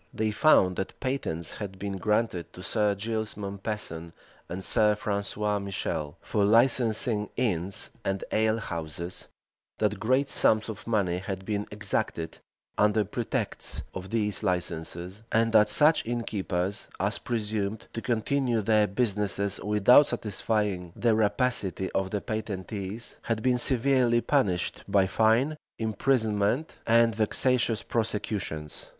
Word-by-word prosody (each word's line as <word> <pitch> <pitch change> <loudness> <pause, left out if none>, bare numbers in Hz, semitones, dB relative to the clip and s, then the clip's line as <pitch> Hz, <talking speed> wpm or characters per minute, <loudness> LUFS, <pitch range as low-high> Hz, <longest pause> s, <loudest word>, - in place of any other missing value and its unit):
They 110 -1 0
found, 105 - +4
that 95 - -4
patents 130 - -2
had 100 -3 -6
been 100 0 -4
granted 105 -4 0
to 90 - -10
Sir 105 0 +1
Giles 110 +1 -3
Mompesson 100 -5 -5 0.4
and 95 +2 -5
Sir 105 -1 +3
Francis 100 -1 -3
Michel, 100 -7 -2
for 105 - 0
licensing 115 -1 +3
inns 95 -6 -1
and 95 0 -2
alehouses; 85 -7 -1 0.5
that 105 -2 0
great 130 +6 +2
sums 110 +1 +3
of 110 - -8
money 95 -6 +1
had 95 0 -5
been 105 -1 -2
exacted, 105 -5 -3 0.4
under 105 +1 +4
pretext - - -3
of 95 +1 -7
these 105 -3 0
licenses; 90 +2 -3
and 115 0 +3
that 105 -1 +6
such 150 +9 +4
innkeepers 100 -5 -2
as 100 +4 0
presumed 110 -2 -2
to 115 - -4
continue 120 0 0
their 105 0 +4
business 100 -2 0
without 105 +7 +5
satisfying 105 -5 -2
the 115 -2 +2
rapacity 105 -3 +1
of 95 -1 -1
the 105 0 -2
patentees, 105 0 -4
had 115 -1 -2
been 125 -1 +3
severely 125 -1 +3
punished 110 - 0
by 100 -1 +3
fine, 115 +9 +2 0.2
imprisonment, 110 +3 0
and 115 0 +5
vexatious 115 +1 +2
prosecutions. 105 -9 -3
105 Hz, 125 wpm, -28 LUFS, 95-115 Hz, 0.5 s, that